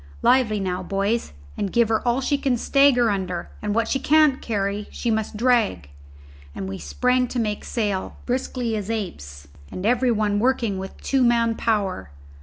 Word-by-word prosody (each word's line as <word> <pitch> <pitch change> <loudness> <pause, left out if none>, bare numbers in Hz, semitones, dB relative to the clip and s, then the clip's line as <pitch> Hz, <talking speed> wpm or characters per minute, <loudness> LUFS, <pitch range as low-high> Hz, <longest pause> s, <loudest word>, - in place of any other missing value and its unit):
Lively 235 -5 +3
now, 185 -1 -2
boys, 200 +5 -1 0.2
and 195 - -3
give 235 -2 +3
her 220 -1 +1
all 240 +2 +2
she 285 +2 +1
can 270 -3 0
stagger 250 -2 +4
under; 185 -3 -3
and 210 0 -2
what 230 -1 +1
she 270 - 0
can't 300 -1 +4
carry 205 -1 -2
she 235 - -2
must 220 -1 -2
drag." 220 - +1 0.6
And 95 - -5
we 95 0 -6
sprang 250 0 +1
to 250 - -5
make 210 -2 -2
sail, 205 -5 -2
briskly 245 -2 -2
as 210 -1 -4
apes, 70 - -5 0.2
and 185 - -5
every 245 +2 +2
one 210 -3 +1
working 230 -5 +1
with 190 0 -7
two 270 -1 +1
man 235 -2 +3
power. 210 - -1
220 Hz, 175 wpm, -23 LUFS, 195-250 Hz, 0.6 s, stagger